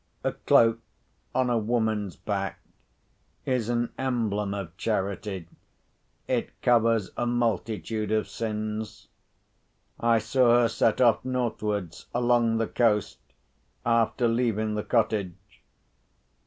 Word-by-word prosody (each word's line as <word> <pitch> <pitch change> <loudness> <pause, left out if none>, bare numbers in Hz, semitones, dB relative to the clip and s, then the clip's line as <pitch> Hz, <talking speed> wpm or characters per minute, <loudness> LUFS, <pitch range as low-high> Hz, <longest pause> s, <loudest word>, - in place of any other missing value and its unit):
A - - +1
cloak 115 0 +3 0.6
(on 130 -1 +2
a 120 - +2
woman's 110 -4 -1
back) - - -3 0.9
is 125 -4 0
an 120 0 0
emblem 110 -6 -1
of 95 -4 -5
charity—it 100 -3 -2 1.2
covers 115 -4 +3
a 120 - -1
multitude 110 -3 -1
of 110 0 +1
sins. 110 -1 -4 0.9
I 115 0 +3
saw 120 +1 +4
her 115 - +3
set 115 +1 +1
off 120 -3 +4
northwards 105 -8 -3
along 120 -2 +3
the 115 - +1
coast, 110 -4 +1 0.7
after 115 +1 +2
leaving 115 -2 0
the 105 - -1
cottage. 105 -6 -2
115 Hz, 105 wpm, -27 LUFS, 105-120 Hz, 1.2 s, saw